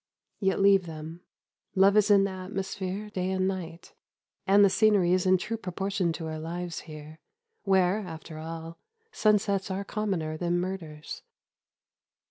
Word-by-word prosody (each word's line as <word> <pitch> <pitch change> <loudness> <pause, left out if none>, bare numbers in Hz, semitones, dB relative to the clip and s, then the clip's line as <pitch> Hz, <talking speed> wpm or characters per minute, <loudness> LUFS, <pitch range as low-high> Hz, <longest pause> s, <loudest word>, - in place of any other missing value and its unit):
Yet 195 -2 +1
leave 195 -2 +5
them. 160 +1 -8 0.5
Love 195 +1 +5
is 210 0 +4
in 200 -1 +6
the 195 - -1
atmosphere 190 +2 -5
day 185 -2 -2
and 190 0 +1
night, 175 -3 -5 0.5
and 200 +1 +7
the - - +5
scenery 200 -5 +4
is 185 0 +2
in 185 0 +5
true 225 +5 -4
proportion 195 -2 -2
to 165 0 -6
our 155 0 -4
lives 170 +1 -4
here, 155 +1 -10 0.5
where, 190 0 +3
after 160 -4 -8
all, 165 +1 -7 0.3
sunsets 205 - +2
are 190 +1 -2
commoner 185 -7 -2
than 175 +1 0
murders." 170 -5 -6
185 Hz, 145 wpm, -28 LUFS, 165-195 Hz, 0.5 s, and